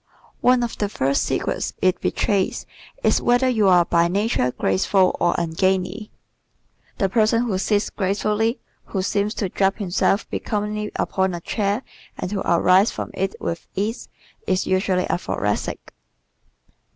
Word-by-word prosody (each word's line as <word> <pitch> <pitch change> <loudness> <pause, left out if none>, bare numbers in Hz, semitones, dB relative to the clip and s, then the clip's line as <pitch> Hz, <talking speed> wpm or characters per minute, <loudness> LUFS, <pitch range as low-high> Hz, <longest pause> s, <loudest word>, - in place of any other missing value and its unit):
One 250 -1 +4
of 235 - -4
the 205 - 0
first 140 -7 0
secrets - - -2
it 185 -1 +1
betrays 195 -3 0 0.4
is - - +3
whether 245 +2 +3
you 220 -5 +2
are 180 -2 +5
by 170 0 +3
nature 195 - 0
graceful 180 - +2
or 175 - +2
ungainly. 185 +4 -1 0.9
The 195 - +2
person 225 +3 +2
who 205 -6 -1
sits 205 +1 0
gracefully, 210 +4 0 0.3
who 190 -2 -3
seems 205 +2 0
to 195 - -2
drape 195 +1 +1
himself 200 +1 0
becomingly 210 0 -3
upon 190 -1 0
a - - -5
chair 205 +6 -1 0.3
and 180 - -4
to 205 - -1
arise 185 +4 +5
from - - -6
it 195 +1 -2
with 165 -1 -4
ease 215 +5 -3 0.4
is 185 - +1
usually 185 -1 +1
a - - 0
Thoracic. - - -3
195 Hz, 145 wpm, -22 LUFS, 185-215 Hz, 0.9 s, are